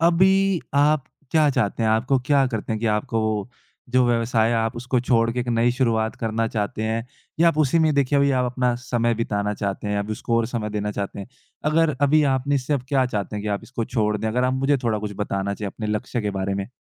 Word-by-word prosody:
अभी 190 +2 +3
आप 145 0 +3 0.3
क्या 155 -2 +4
चाहते 110 -3 0
हैं? 110 - +2
आपको 125 +5 +2
क्या 140 -2 +4
करते 110 -3 -3
है 110 - -2
कि 115 - -2
आपको 110 0 -1 0.4
जो 130 0 +4
व्यवसाय 115 -1 +2
है - - +1
आप 115 +1 -1
उसको 125 +2 -1
छोड़कर 115 -1 +1
एक 120 - -4
नई 120 0 +2
शुरुआत 115 -3 0
करना 115 0 -1
चाहते 105 -1 -3
हैं? 115 +2 -2 0.3
या 170 - +6
आप 160 -2 -1
उसी 155 +2 +3
में 160 -1 +3
अभी 140 0 +2
अपना 125 -1 +1
समय 120 -2 0
बिताना 105 -2 -1
चाहते 100 0 -3
हैं, 105 - 0
आप 100 +1 -3
उसको 115 +2 -1
और 115 -1 +1
समय 110 -3 -3
देना 105 0 -2
चाहते 100 0 -4
हैं? 100 - -8 0.4
अगर 155 -1 +2
अभी 145 +2 +4
आपने 140 +2 0
इससे 135 +1 -1
अब 135 - -2
क्या 135 -3 +2
चाहते 105 -3 -3
हैं 105 - -4
कि 105 - -3
आप 100 -1 -2
इसको 120 -3 -4
छोड़ 105 -3 0
दें? 110 +1 -2
अगर 125 +3 0
आप 130 - +1
मुझे 135 +2 +2
थोड़ा 115 -3 0
कुछ 105 0 -5
बताना 100 -1 -2
चाहें 100 -1 -5
अपने 110 - -6
लक्ष्य 110 +3 -2
के 105 - -1
बारे 95 0 -2
में। 100 +2 -4
115 Hz, 230 wpm, -23 LUFS, 105-135 Hz, 0.4 s, या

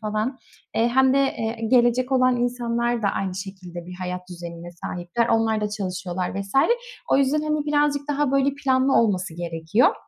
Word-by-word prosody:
falan, 215 +5 -2 0.4
eee, 230 +1 +3
hem 265 +2 +4
de, - - +4
eee, 230 -4 -1
gelecek 250 +1 +3
olan 255 -1 +4
insanlar 240 -1 -1
da 200 - +2
aynı 190 -1 -2
şekilde 185 -3 -8
bir 180 - -8
hayat 180 0 -3
düzenine 170 -1 -8
sahipler. 175 +6 -3
Onlar 225 -1 +2
da 210 - -1
çalışıyorlar 185 -3 -3
vs. 195 0 -8 0.6
O - - +6
yüzden, 280 +2 +2
hani, 305 -1 -1
birazcık 290 -1 +1
daha, 290 -1 +1
böyle, 275 0 +2
planlı 265 0 +3
olması 185 -7 +2
gerekiyor. 170 +5 +1
230 Hz, 165 wpm, -23 LUFS, 185-260 Hz, 0.6 s, O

